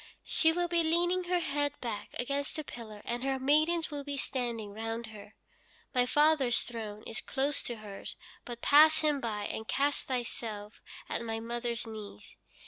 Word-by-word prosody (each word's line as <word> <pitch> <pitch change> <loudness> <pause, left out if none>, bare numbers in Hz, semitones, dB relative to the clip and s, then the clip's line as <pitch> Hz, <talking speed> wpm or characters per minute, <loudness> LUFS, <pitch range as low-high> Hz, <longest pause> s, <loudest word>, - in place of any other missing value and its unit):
She 320 - +4
will 350 +1 0
be 340 0 +3
leaning 350 +3 +2
her 360 0 +2
head 290 -2 0
back 230 -4 -4
against 280 +4 -1
a 310 - -2
pillar, 215 -6 -9
and 240 +1 -2
her 270 0 +1
maidens 310 +5 +3
will 290 -1 -4
be 285 0 -4
standing 235 -6 -2
round 225 +2 -3
her. 210 0 -12 0.6
My 250 -1 +3
father's 295 -4 +4
throne 215 -3 -6
is 225 - -4
close 275 +2 0
to 240 - -4
hers, 210 -3 -7 0.3
but 240 -1 -8
pass 310 +2 +7
him 300 -2 +2
by, 210 -3 -2
and 220 +1 -4
cast 285 +1 +1
thyself 225 -4 -4 0.3
at - - -2
my 225 -1 -2
mother's 235 +1 -2
knees. 215 - -9
245 Hz, 170 wpm, -31 LUFS, 225-295 Hz, 0.6 s, pass